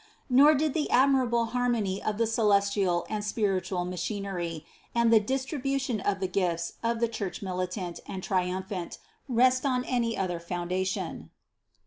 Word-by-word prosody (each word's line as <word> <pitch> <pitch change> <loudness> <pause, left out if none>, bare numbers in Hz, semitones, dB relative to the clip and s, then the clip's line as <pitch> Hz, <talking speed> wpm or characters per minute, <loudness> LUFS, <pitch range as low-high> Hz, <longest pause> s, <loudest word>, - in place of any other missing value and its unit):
Nor 290 +5 +7
did 300 0 +1
the 305 -2 -1
admirable 255 -3 +3
harmony 235 -6 0
of 210 -1 -2
the 230 - +2
celestial 200 -5 +2
and 210 -1 -3
spiritual 195 -4 -1
machinery, 180 -3 -4 0.3
and 235 -1 +4
the 220 - +8
distribution 265 +1 -1
of 200 0 -1
the 190 - -1
gifts 175 -3 -1
of 230 0 0
the 235 - +2
Church 210 -4 -5
militant 185 -1 -3
and 190 -1 -6
triumphant 185 0 -2 0.3
rest 255 +1 +4
on 255 -3 +1
any 235 -2 0
other 180 -3 -1
foundation. 180 +2 -3
205 Hz, 140 wpm, -28 LUFS, 185-240 Hz, 0.3 s, the